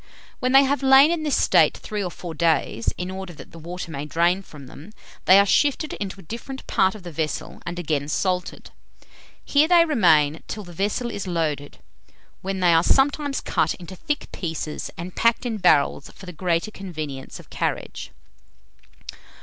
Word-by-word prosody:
When 255 Hz, -, 0 dB
they 270 Hz, +1 st, +7 dB
have 280 Hz, +1 st, 0 dB
lain 270 Hz, +3 st, +7 dB
in 340 Hz, -2 st, -1 dB
this 300 Hz, -2 st, +1 dB
state -, -, +4 dB
three 210 Hz, -2 st, -4 dB
or 180 Hz, -, -2 dB
four 175 Hz, -1 st, -8 dB
days, 155 Hz, -8 st, +1 dB
in 180 Hz, +1 st, -4 dB
order 190 Hz, -1 st, -7 dB
that -, -, -13 dB
the 165 Hz, -, -12 dB
water 170 Hz, +1 st, -7 dB
may 140 Hz, -1 st, -5 dB
drain 170 Hz, +4 st, +2 dB
from 150 Hz, -7 st, -13 dB
them, 155 Hz, +10 st, -13 dB, 0.3 s
they 190 Hz, -, +8 dB
are 200 Hz, -, +6 dB
shifted 290 Hz, +7 st, +1 dB
into 195 Hz, -1 st, -5 dB
a -, -, -12 dB
different 235 Hz, -, -8 dB
part 190 Hz, +2 st, +2 dB
of 210 Hz, -, -11 dB
the 175 Hz, -, -8 dB
vessel, 155 Hz, -1 st, -4 dB
and 175 Hz, 0 st, -4 dB
again 150 Hz, -4 st, -2 dB
salted. 180 Hz, +3 st, -2 dB, 0.7 s
Here 290 Hz, +2 st, +3 dB
they 340 Hz, -1 st, +6 dB
remain 160 Hz, -, +3 dB
till 210 Hz, -, -5 dB
the 175 Hz, -2 st, -12 dB
vessel 210 Hz, +7 st, -2 dB
is 200 Hz, -3 st, -5 dB
loaded, 155 Hz, -5 st, -2 dB, 0.6 s
when 190 Hz, 0 st, -3 dB
they 175 Hz, -2 st, +5 dB
are 165 Hz, -, +5 dB
sometimes 285 Hz, -, +2 dB
cut 160 Hz, -3 st, 0 dB
into 180 Hz, +1 st, -10 dB
thick 295 Hz, +10 st, -4 dB
pieces 160 Hz, -3 st, -4 dB
and 175 Hz, +2 st, -7 dB
packed 230 Hz, +1 st, +2 dB
in 230 Hz, -3 st, -2 dB
barrels 145 Hz, -4 st, +3 dB
for 190 Hz, -, -14 dB
the 180 Hz, -, -8 dB
greater 170 Hz, +3 st, -1 dB
convenience 155 Hz, -9 st, -7 dB
of -, -, -16 dB
carriage. -, -, -3 dB
180 Hz, 180 wpm, -23 LUFS, 160-230 Hz, 0.7 s, they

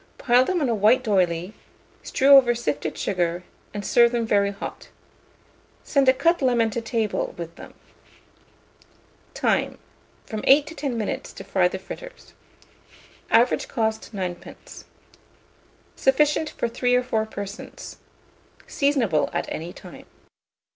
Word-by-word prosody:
Pile 245 Hz, +1 st, +4 dB
them 360 Hz, +1 st, -1 dB
on 280 Hz, -, +1 dB
a 235 Hz, -, +1 dB
white 220 Hz, +5 st, +3 dB
d'oyley, 180 Hz, -3 st, 0 dB, 0.5 s
strew 270 Hz, -, 0 dB
over 245 Hz, -3 st, +5 dB
sifted 150 Hz, -9 st, -3 dB
sugar, 175 Hz, -1 st, -1 dB, 0.3 s
and 205 Hz, -1 st, -6 dB
serve 235 Hz, -1 st, +4 dB
them 235 Hz, -2 st, -1 dB
very 200 Hz, -2 st, +2 dB
hot. 200 Hz, 0 st, -8 dB, 0.9 s
Send 275 Hz, -3 st, +2 dB
a -, -, +6 dB
cut 335 Hz, +5 st, +1 dB
lemon 240 Hz, -4 st, +2 dB
to 235 Hz, -, -3 dB
table 225 Hz, -2 st, -2 dB
with 170 Hz, -1 st, -7 dB
them. -, -, -13 dB, 1.6 s
Time. -, -, 0 dB, 0.5 s
From 215 Hz, -1 st, -6 dB
8 285 Hz, +2 st, +6 dB
to 320 Hz, -, -9 dB
10 275 Hz, -7 st, -3 dB
minutes 215 Hz, -, -4 dB
to -, -, -9 dB
fry 185 Hz, -2 st, +2 dB
the 185 Hz, -, -4 dB
fritters. -, -, -11 dB, 1.0 s
Average 240 Hz, +2 st, +3 dB
cost, 220 Hz, -3 st, -2 dB
9d. 185 Hz, -4 st, -7 dB, 1.1 s
Sufficient 300 Hz, +3 st, +2 dB
for -, -, -3 dB
3 245 Hz, +1 st, 0 dB
or 250 Hz, -, +2 dB
4 220 Hz, -3 st, -1 dB
persons. 205 Hz, 0 st, -8 dB, 0.7 s
Seasonable 265 Hz, -, +1 dB
at -, -, -1 dB
any 165 Hz, +2 st, -5 dB
time. -, -, -13 dB
230 Hz, 135 wpm, -23 LUFS, 195-260 Hz, 1.6 s, a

